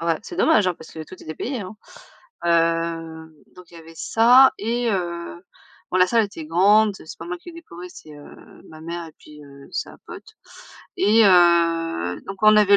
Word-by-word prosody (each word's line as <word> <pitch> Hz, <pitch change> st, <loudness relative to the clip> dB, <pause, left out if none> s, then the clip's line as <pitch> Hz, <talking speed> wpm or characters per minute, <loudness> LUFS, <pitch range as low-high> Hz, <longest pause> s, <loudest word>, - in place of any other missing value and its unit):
Oh 170 Hz, -, -5 dB
ouais, 165 Hz, -2 st, +1 dB
c'est 350 Hz, -, -9 dB
dommage, 215 Hz, -12 st, +3 dB
hein, 180 Hz, -, 0 dB
parce 160 Hz, -, -14 dB
que 160 Hz, -, -8 dB
tout -, -, -12 dB
était 155 Hz, 0 st, -8 dB
payé, 250 Hz, -, -4 dB
hein. 190 Hz, +2 st, -9 dB, 0.7 s
Heu, 165 Hz, -1 st, -1 dB, 0.3 s
donc 180 Hz, -1 st, -14 dB
il -, -, -18 dB
y 165 Hz, -, -11 dB
avait 165 Hz, 0 st, -15 dB
ça 250 Hz, +4 st, +5 dB
et 235 Hz, +2 st, -1 dB
heu, 175 Hz, -2 st, -4 dB, 0.5 s
bon 185 Hz, -, -1 dB
la 180 Hz, -, +5 dB
salle 230 Hz, +1 st, +2 dB
était 165 Hz, -6 st, -9 dB
grande, 205 Hz, +5 st, +3 dB
c'est 160 Hz, -, -12 dB
pas 165 Hz, -, -8 dB
moi 180 Hz, +1 st, -5 dB
qui -, -, -15 dB
ai -, -, -15 dB
décoré, 180 Hz, -, -11 dB
c'est, 155 Hz, -, -14 dB
heu, 145 Hz, 0 st, -14 dB, 0.3 s
ma 155 Hz, 0 st, -13 dB
mère 170 Hz, 0 st, -6 dB
et 160 Hz, -, -14 dB
puis, 150 Hz, -1 st, -15 dB
heu, 140 Hz, 0 st, -15 dB
sa -, -, -5 dB
pote. -, -, -12 dB, 0.6 s
Et 215 Hz, +2 st, +4 dB
heu, 165 Hz, -, +2 dB
donc 195 Hz, -, -7 dB
on 215 Hz, 0 st, +6 dB
avait 205 Hz, -1 st, +5 dB
175 Hz, 205 wpm, -22 LUFS, 165-210 Hz, 0.7 s, on